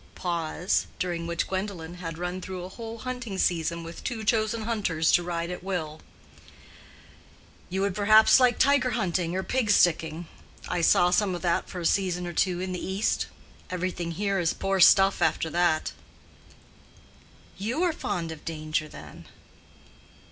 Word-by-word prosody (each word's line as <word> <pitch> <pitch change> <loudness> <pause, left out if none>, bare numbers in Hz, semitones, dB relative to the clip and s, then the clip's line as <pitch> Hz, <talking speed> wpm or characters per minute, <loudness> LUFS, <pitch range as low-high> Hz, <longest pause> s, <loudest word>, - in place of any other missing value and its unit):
(Pause 170 0 -1
during 170 -2 -3
which 170 -1 -1
Gwendolen 185 -4 -4
had 165 -2 -6
run 180 +1 -4
through 185 -1 -6
a 180 - -7
whole 225 +3 -8
hunting 250 -4 -5
season 170 -2 0
with 165 0 -9
two 230 -4 -3
chosen 220 0 +1
hunters 200 -8 0
to - - +4
ride 170 0 -3
at 180 - -7
will.) 160 -5 -4 1.7
"You 190 +2 -2
would 200 -1 0
perhaps 215 +4 +6
like 250 -2 +4
tiger 280 -2 +3
hunting 175 -1 -1
or 190 - -1
pig 255 -1 -1
sticking. 165 -3 +2 0.4
I 175 - -1
saw 175 +1 +4
some 190 0 +2
of 175 - -7
that 170 -1 0
for 180 - -6
a - - -4
season 180 -1 +1
or 175 - -5
two 180 +1 +1
in 185 0 -3
the 180 - -4
East. 190 +3 0 0.4
Everything 180 -2 -3
here 200 +2 -1
is 170 -2 +1
poor 195 0 -1
stuff 195 +2 +6
after 160 - +1
that." 175 -2 +1 1.7
"You 240 - -1
are 350 -3 +2
fond 170 - -3
of 160 -2 -9
danger, 155 -1 -3
then?" - - -12
180 Hz, 160 wpm, -27 LUFS, 170-200 Hz, 1.7 s, perhaps